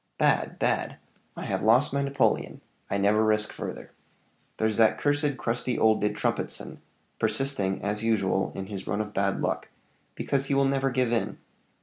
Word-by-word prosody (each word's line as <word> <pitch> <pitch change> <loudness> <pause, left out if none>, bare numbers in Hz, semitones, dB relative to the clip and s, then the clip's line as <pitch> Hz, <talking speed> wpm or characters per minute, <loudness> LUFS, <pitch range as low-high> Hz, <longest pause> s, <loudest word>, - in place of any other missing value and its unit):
"Bad - - +2
bad! - - 0 0.4
I - - -5
have - - -1
lost 120 +7 +4
my 140 - +1
napoleon: 140 0 0 0.3
I 100 - 0
never 105 +2 +3
risk 105 -1 +1
further. - - -7 0.7
There's 110 -1 0
that 110 -1 +4
cursed 145 -1 +1
crusty 120 +1 -1
old 110 -1 +3
De 105 - +2
Trumpetson, 105 - -3 0.4
persisting, 100 -9 0
as 105 +2 -1
usual, 100 -4 +1
in 95 - -4
his 100 -1 -7
run 105 - -1
of 105 0 -6
bad 100 0 0
luck, - - -2 0.5
because 135 -1 -1
he 140 - +1
will 135 0 +4
never 135 0 +1
give 125 -2 0
in. 105 -3 -1
110 Hz, 165 wpm, -27 LUFS, 105-135 Hz, 0.7 s, lost